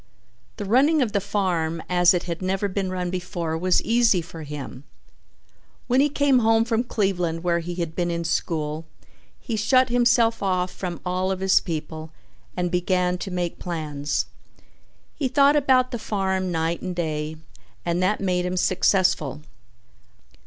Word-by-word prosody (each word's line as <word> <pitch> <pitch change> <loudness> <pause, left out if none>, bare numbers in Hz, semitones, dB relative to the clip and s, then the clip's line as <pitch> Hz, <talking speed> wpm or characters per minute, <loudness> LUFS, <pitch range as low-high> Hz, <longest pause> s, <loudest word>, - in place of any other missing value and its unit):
The 205 - -4
running 275 +8 +4
of 225 - -2
the 200 -1 0
farm 175 -5 -1
as 180 0 +4
it 175 - -1
had 170 -1 -5
never 190 +2 0
been 195 -1 -2
run 180 -1 -3
before 175 -3 -3
was 180 +3 +2
easy 230 -4 +3
for 165 -1 -8
him. 145 -3 -7 1.0
When 255 +2 +3
he 295 - +3
came 280 -2 +3
home 225 0 +3
from 235 +1 0
Cleveland 180 -7 -1
where 170 -1 +1
he 175 +1 -5
had 170 -2 -4
been 175 -1 0
in 170 0 -2
school, 155 -1 -2 0.5
he 230 - -4
shut 255 +4 +3
himself 235 -1 +3
off 185 -2 0
from 175 -3 -5
all 185 +1 -1
of 190 -1 -2
his 190 0 +4
people 160 -1 -5 0.5
and 180 -1 -1
began 180 0 +1
to 195 - -5
make 175 -2 -3
plans. 150 -4 -2 0.9
He 280 - -1
thought 280 +3 +4
about 260 -3 +3
the 240 - -3
farm 190 -3 -1
night 165 0 -1
and 185 -1 -4
day 155 -2 -2 0.5
and 170 +1 0
that 190 +3 +1
made 180 -2 0
him 180 +1 -2
successful. 180 -6 +2
180 Hz, 160 wpm, -24 LUFS, 170-215 Hz, 1.0 s, running